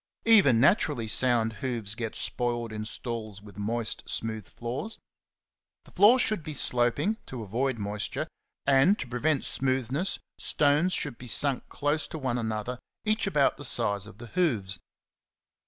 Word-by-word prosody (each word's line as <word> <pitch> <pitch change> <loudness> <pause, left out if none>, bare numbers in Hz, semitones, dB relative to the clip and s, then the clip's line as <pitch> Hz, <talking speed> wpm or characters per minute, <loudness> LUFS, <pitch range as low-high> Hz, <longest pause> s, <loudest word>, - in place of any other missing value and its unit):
Even 195 - +6
naturally 135 - +3
sound 115 0 +3
hoofs 115 -6 0
get 110 -1 -5
spoiled 120 -2 -2
in 110 0 -5
stalls 110 -3 -5
with 100 -1 -13
moist, 115 +2 -2
smooth 110 -3 -3
floors. 125 - -3 0.9
The - - -17
floors 230 +7 +6
should 215 -5 +1
be 155 -1 -6
slop 120 -2 +4
ing, 205 +10 0
to 125 -4 -6
avoid 120 +5 -1
moisture, 105 0 -3 0.4
and, 140 +9 +4
to - - -5
prevent 135 +5 0
smoothness, 135 - -1 0.2
stones 150 +5 +2
^^ - - +5
should 135 -6 -4
be 125 - -9
sunk 130 +3 +1
close 145 +1 -1
to - - -7
one 130 -4 -2
another, 110 +2 -3 0.3
each 215 -1 +1
about 150 -7 +2
the - - -7
size 105 -6 +2
of 105 - -13
the 120 - -9
hoofs. 110 - 0
125 Hz, 155 wpm, -28 LUFS, 110-145 Hz, 0.9 s, Even